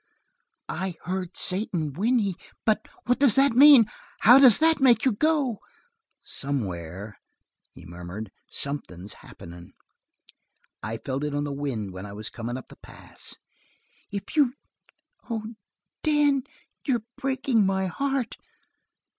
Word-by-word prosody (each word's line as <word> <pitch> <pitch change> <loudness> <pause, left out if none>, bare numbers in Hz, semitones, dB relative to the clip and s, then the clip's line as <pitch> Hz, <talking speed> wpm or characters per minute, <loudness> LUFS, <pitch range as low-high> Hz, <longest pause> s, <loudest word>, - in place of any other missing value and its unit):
"I 190 -2 -3
heard 185 0 -4
Satan 180 -6 0
whinney. 210 - +1 0.3
But 215 -1 +1 0.2
what 250 0 +1
does 270 -6 +5
that 275 0 +5
mean? 275 -2 +9 0.4
How 245 +4 +8
does 255 -6 +8
that 320 0 +3
make 245 -3 +5
you 260 - +4
go?" 275 -1 +1 0.6
"Somewhere," 100 - -4 0.6
he - - -13
murmured, 90 +5 -8 0.2
"something's 105 -10 -3
happening. 85 +1 -12 1.1
I 110 +2 -4
felt 135 +4 -4
it 150 -1 -2
on 145 - 0
the 145 -1 -3
wind 125 -9 -4
when 95 +2 -7
I 100 - -9
was 110 +2 -6
comin' 120 +2 -5
up 130 - -11
the - - -14
pass." - - -11 0.8
"If 200 +7 -6
you 280 -4 +3 0.7
oh, 225 0 -4 0.5
Dan, 295 -3 +2 0.4
you're 240 -6 0
breaking 265 -4 +1
my 190 0 +1
heart!" 270 +5 -2
190 Hz, 130 wpm, -26 LUFS, -, 1.1 s, mean